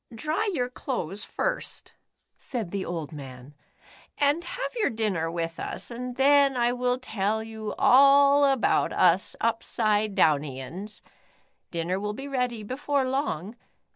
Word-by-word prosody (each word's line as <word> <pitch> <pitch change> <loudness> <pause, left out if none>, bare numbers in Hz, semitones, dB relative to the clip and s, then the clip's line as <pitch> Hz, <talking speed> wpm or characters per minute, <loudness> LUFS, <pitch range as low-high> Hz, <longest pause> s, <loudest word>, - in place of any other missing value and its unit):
"Dry 315 - -1
your 250 -9 -1
clothes 210 - -4
first," - - -3 0.4
said 225 -9 -5
the 200 -1 -2
old 165 -4 -5
man, 135 -2 -10 0.3
*' - - -24 0.3
and 290 +4 +2
have 350 - -5
your 445 -3 +1
dinner 205 -8 -1
with 165 0 -4
us, 190 - -5
and 250 +1 -5
then 275 0 +4
I 240 0 +2
will 250 0 0
tell 220 -3 -2
you 220 -1 -6
all 280 +2 +6
about 270 -4 +2
us 180 +1 +3
Upsidedownians. 200 - 0 0.7
Dinner 170 +2 -2
will 210 +1 -3
be 270 +6 -7
ready 250 -5 -2
before 265 +4 -1
long. 235 - -2
225 Hz, 135 wpm, -26 LUFS, 185-270 Hz, 0.7 s, all